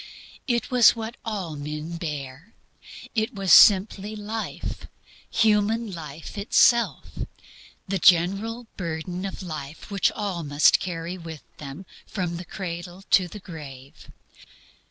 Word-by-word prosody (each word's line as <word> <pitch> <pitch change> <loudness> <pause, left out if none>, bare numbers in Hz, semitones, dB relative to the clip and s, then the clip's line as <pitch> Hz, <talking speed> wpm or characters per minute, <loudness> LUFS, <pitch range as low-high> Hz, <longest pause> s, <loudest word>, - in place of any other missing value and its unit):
It 240 +1 0
was 245 -2 +7
what 225 +1 -5
all 195 -8 -4
men 150 +3 -5
bear. 150 +3 -6 0.6
It 220 +2 -1
was 195 -5 +3
simply 205 +1 +6
life, 215 +1 -5 0.4
human 220 +1 +2
life 160 +2 -8
itself, 235 +3 +3 0.7
the 195 0 -1
general 195 +8 +3
burden 175 +1 -4
of 195 0 -6
life 155 0 -7
which 200 -1 +2
all 200 -5 -3
must 145 -1 +4
carry 175 0 -4
with 165 -3 -9
them 145 +5 -8 0.2
from 175 -4 -3
the 180 - -7
cradle 175 +1 -6
to 185 -2 +5
the 210 - -9
grave. 140 -7 -11
180 Hz, 120 wpm, -25 LUFS, 160-210 Hz, 0.7 s, was